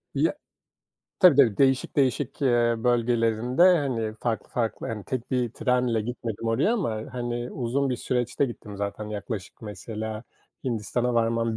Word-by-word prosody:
Ya -, -, +2 dB, 0.9 s
tabii, 180 Hz, -7 st, +7 dB
tabii. 120 Hz, -8 st, +5 dB
Değişik 135 Hz, 0 st, +2 dB
değişik, 135 Hz, +1 st, 0 dB
eee, 120 Hz, -2 st, +3 dB
bölgelerinde, 120 Hz, +2 st, +2 dB
hani, 135 Hz, -12 st, +3 dB
farklı 115 Hz, -2 st, -2 dB
farklı 115 Hz, -2 st, -2 dB
hani, 105 Hz, -3 st, -5 dB
tek 130 Hz, -1 st, -4 dB
bir 125 Hz, -2 st, 0 dB
trenle 125 Hz, -3 st, +1 dB
gitmedim 115 Hz, -1 st, -4 dB
oraya 130 Hz, -, +2 dB
ama, 110 Hz, -, -2 dB
hani, 120 Hz, 0 st, -3 dB
uzun 130 Hz, +3 st, -1 dB
bir 125 Hz, -, 0 dB
süreçte 125 Hz, +3 st, 0 dB
gittim 105 Hz, -4 st, -8 dB
zaten. 100 Hz, +1 st, -4 dB
Yaklaşık, 105 Hz, -1 st, -6 dB
mesela, 110 Hz, +1 st, -6 dB, 0.4 s
Hindistan'a 120 Hz, +1 st, -1 dB
varmam 115 Hz, -1 st, +1 dB
120 Hz, 140 wpm, -26 LUFS, 110-125 Hz, 0.9 s, tabii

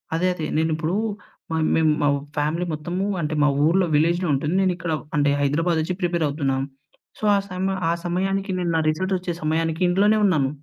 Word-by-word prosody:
అదే 180 Hz, +3 st, +1 dB
అదే. 160 Hz, -3 st, -4 dB
నేనిప్పుడు 160 Hz, +1 st, 0 dB, 0.6 s
మ -, -, -1 dB, 0.2 s
మేము 160 Hz, -1 st, +3 dB
మా 145 Hz, -, +3 dB, 0.3 s
ఫ్యామిలీ 155 Hz, +4 st, 0 dB
మొత్తము, 175 Hz, +5 st, -3 dB, 0.2 s
అంటే 150 Hz, +1 st, -2 dB
మా -, -, +5 dB, 0.2 s
ఊర్లో 180 Hz, +3 st, +3 dB
విలేజ్‌లో 170 Hz, +3 st, +2 dB
ఉంటుంది. 150 Hz, +5 st, -1 dB
నేనిక్కడ 175 Hz, -3 st, -1 dB, 0.5 s
హైదరాబాద్ 165 Hz, +4 st, +1 dB
వచ్చి 180 Hz, +3 st, -2 dB
ప్రిపేర్ 170 Hz, -2 st, 0 dB
అవుతున్నాను. 135 Hz, -2 st, -1 dB, 0.5 s
సో, -, -, -15 dB
ఆ -, -, +3 dB
సమయ 190 Hz, +1 st, -2 dB
ఆ -, -, +3 dB
సమయానికి 195 Hz, +3 st, -1 dB
నేను 175 Hz, -1 st, -1 dB
నా 160 Hz, -, +3 dB
రిజల్ట్స్ 185 Hz, +5 st, -1 dB
వచ్చే 180 Hz, -1 st, -4 dB
సమయానికి 160 Hz, +2 st, -1 dB
ఇంట్లోనే 205 Hz, +4 st, +3 dB
ఉన్నాను. 150 Hz, -9 st, +2 dB
170 Hz, 170 wpm, -23 LUFS, 155-185 Hz, 0.6 s, మా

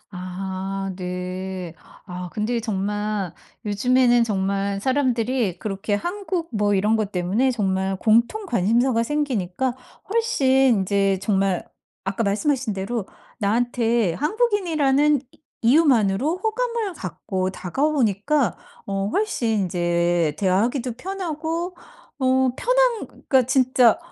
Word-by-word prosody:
아 190 Hz, +1 st, -4 dB
네. 180 Hz, -1 st, -5 dB, 0.3 s
아 180 Hz, -1 st, -6 dB
근데 230 Hz, +2 st, -1 dB
정말 205 Hz, -3 st, -2 dB, 0.3 s
요즘에는 240 Hz, +3 st, +3 dB
정말 195 Hz, -1 st, -1 dB
사람들이 245 Hz, -6 st, 0 dB
그렇게 205 Hz, 0 st, -2 dB
한국 350 Hz, -, -3 dB
뭐 205 Hz, -2 st, +1 dB
이런 210 Hz, +3 st, +2 dB
것 210 Hz, -2 st, -2 dB
때문에 195 Hz, +9 st, +1 dB
정말 190 Hz, -4 st, 0 dB
공통 235 Hz, -, +2 dB
관심사가 235 Hz, -, +2 dB
생기니까 250 Hz, -4 st, -1 dB, 0.4 s
훨씬 455 Hz, -12 st, +1 dB, 0.3 s
인제 195 Hz, 0 st, +1 dB
정말 195 Hz, -2 st, +1 dB, 0.4 s
아까 195 Hz, +4 st, -1 dB
말씀하신 245 Hz, +3 st, 0 dB
대로 195 Hz, +2 st, -3 dB, 0.3 s
나한테 230 Hz, -2 st, +1 dB
한국인이라는 300 Hz, -, +2 dB
이 -, -, -25 dB, 0.2 s
이유만으로 260 Hz, -, +3 dB
호감을 450 Hz, -1 st, -1 dB
갖고 185 Hz, -, -3 dB
다가오니까 250 Hz, -, 0 dB, 0.3 s
어 195 Hz, 0 st, -1 dB
훨씬 400 Hz, -, 0 dB
인제 175 Hz, -3 st, +1 dB
대화하기도 230 Hz, +7 st, +1 dB
편하고 340 Hz, 0 st, -4 dB, 0.4 s
어 260 Hz, -1 st, +3 dB
편한 -, -, +2 dB
그러니까 265 Hz, -3 st, +1 dB
진짜 255 Hz, -3 st, +4 dB
225 Hz, 255 characters per minute, -23 LUFS, 195-275 Hz, 0.4 s, 진짜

